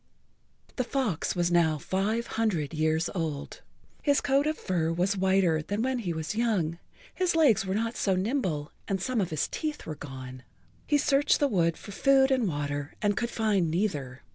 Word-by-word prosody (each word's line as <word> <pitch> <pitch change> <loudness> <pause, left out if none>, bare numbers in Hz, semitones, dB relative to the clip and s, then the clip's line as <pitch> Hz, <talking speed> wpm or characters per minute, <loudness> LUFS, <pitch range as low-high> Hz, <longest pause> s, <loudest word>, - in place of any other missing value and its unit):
The 255 - +1
fox 240 - -1
was 175 -1 +1
now 165 -3 +3
five 205 +9 -1
hundred 185 -12 -1
years 160 +2 +1
old. 160 -6 -4 0.4
His 285 -1 +3
coat 280 +1 +2
of 310 - -1
fur 165 -3 -1
was 180 +4 +1
whiter 190 -4 +2
than 205 +8 -2
when 260 -1 0
he 190 -7 -2
was 160 +3 -3
young, 200 -8 0 0.3
his 365 -2 0
legs 230 -11 +4
were 190 - -1
not 230 +2 -1
so 195 -6 +1
nimble 185 - -1 0.2
and 195 -1 -1
some 230 +4 0
of 180 - -1
his 155 -2 -1
teeth 305 -1 -4
were 155 - -4
gone. 130 -3 -9 0.5
He 295 - +3
searched 285 0 +3
the 285 - +3
wood 170 -8 +1
for 205 - -10
food 270 +5 +4
and 255 -5 +2
water 145 -2 -3
and 205 -1 +1
could 235 - -1
find 210 -8 +1
neither. 150 - -2
190 Hz, 185 wpm, -28 LUFS, 160-235 Hz, 0.5 s, legs